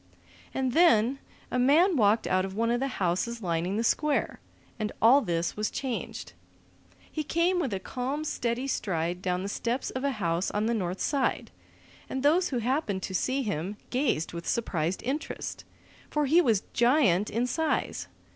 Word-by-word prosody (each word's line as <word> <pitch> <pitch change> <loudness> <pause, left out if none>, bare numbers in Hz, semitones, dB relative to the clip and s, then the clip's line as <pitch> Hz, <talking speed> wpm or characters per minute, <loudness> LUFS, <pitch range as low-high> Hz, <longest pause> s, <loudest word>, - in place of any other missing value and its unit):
And 260 -1 -1
then 265 -5 +4 0.3
a 250 - 0
man 320 +9 +5
walked 215 -3 +3
out 185 0 +2
of 190 0 -5
one 230 +2 +1
of 240 - +1
the 270 - 0
houses 200 +6 -1
lining 175 +3 -1
the 225 - 0
square, 295 +5 +1 0.4
and 210 -1 -2
all 255 +6 +6
this 170 -5 -1
was 210 0 -1
changed. 260 -4 -4 0.8
He 310 - -2
came 340 +4 +1
with 280 -9 -1
a 195 - -2
calm, 260 +8 -3
steady 245 -4 -2
stride 175 -8 -2
down 180 0 -1
the - - -3
steps 235 +5 -2
of 260 - -4
a 280 -1 +1
house 175 -4 -1
on 210 +1 -1
the 235 - +1
north 185 -4 -2
side, 280 -3 0 0.6
and 265 - -3
those 330 +6 +4
who 255 - -1
happened 235 - -1
to 190 - -4
see 260 +8 0
him 200 -1 -3
gazed 245 - 0
with 170 0 -6
surprised 175 -6 -1
interest. 290 +6 -4 0.4
For 300 -1 +1
he 320 +6 +5
was 225 - +2
a - - -31
giant 235 - +3
in 235 +3 0
size. 315 +5 -1
235 Hz, 175 wpm, -28 LUFS, 190-275 Hz, 0.8 s, all